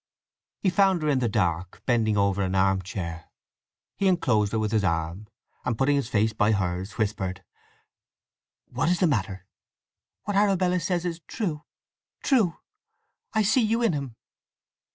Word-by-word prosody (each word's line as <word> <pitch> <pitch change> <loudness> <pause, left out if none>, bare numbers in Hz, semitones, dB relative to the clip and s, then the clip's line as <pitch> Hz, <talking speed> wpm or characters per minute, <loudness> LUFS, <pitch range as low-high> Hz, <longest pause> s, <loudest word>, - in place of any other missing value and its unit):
He 190 - +1
found 190 -3 +3
her 155 - +1
in 140 -3 +2
the 120 -2 0
dark, 90 -4 -1
bending 110 -4 +2
over 100 0 +2
an 95 0 -1
arm 95 0 +3
chair. 85 -3 -6 0.7
He 195 - +1
enclosed 115 - +2
her 115 - 0
with 110 -1 -1
his 110 -2 +2
arm, 85 +3 -2 0.4
and 120 -3 -1
putting 140 +3 +2
his 140 -5 -1
face 110 -1 +1
by 110 0 +2
hers, 95 0 -2
whispered, 100 -4 -2 1.2
"What's 175 +1 0
the 185 - +4
matter?" 100 - -1 0.8
"What 205 - -3
Arabella 190 -3 +3
says 175 0 -1
is 170 -1 -3
true—true! 190 - -2 0.8
I 220 -1 +3
see 220 +6 +3
you 230 +2 +1
in 225 - +3
him!" 140 -5 -4
110 Hz, 150 wpm, -26 LUFS, -, 1.2 s, the